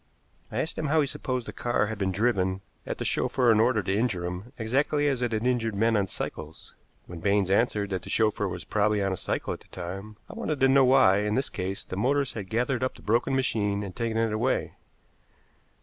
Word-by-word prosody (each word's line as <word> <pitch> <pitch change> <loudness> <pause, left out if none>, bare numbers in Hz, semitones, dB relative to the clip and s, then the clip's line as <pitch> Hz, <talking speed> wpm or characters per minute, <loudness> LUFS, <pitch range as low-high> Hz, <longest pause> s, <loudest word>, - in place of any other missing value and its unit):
I - - -2
asked 160 - -3
him 155 - -1
how 155 +3 +3
he - - +2
supposed 130 -2 -3
the - - -7
car 120 -3 0
had 110 0 -5
been 95 -1 0
driven 95 -3 +1 0.3
at - - -3
the - - -4
chauffeur 125 -3 +2
in 110 - +4
order 110 -2 +3
to 95 +2 0
injure 105 -6 0
him, 90 +7 -6
exactly 140 +6 +1
as 135 -3 0
it 120 -1 0
had 110 +1 -1
injured 115 -4 +1
men 115 +3 +2
on 100 -2 +1
cycles. 80 -3 -7 0.3
When 85 -1 -9
Baines 100 +1 +1
answered 105 -1 +1
that 95 -2 -1
the - - -10
chauffeur 105 -2 +1
was 90 - -5
probably 105 -1 +1
on 95 -1 0
a - - -1
cycle - - -2
at - - -8
the - - -21
time, 95 +4 -7
I - - -10
wanted 155 -3 -3
to 135 - +6
know 135 0 +5
why, 125 -7 +5
in 105 +1 0
this 135 - 0
case, 95 +1 -4
the 95 - -6
motorist 140 +5 +1
had 100 -4 -6
gathered 125 +2 0
up 130 - -1
the - - -15
broken 120 +5 +1
machine 105 -6 0
and 95 -2 -7
taken 115 -1 -2
it 115 -1 +1
away. 120 +5 0
110 Hz, 230 wpm, -27 LUFS, 100-125 Hz, 0.3 s, to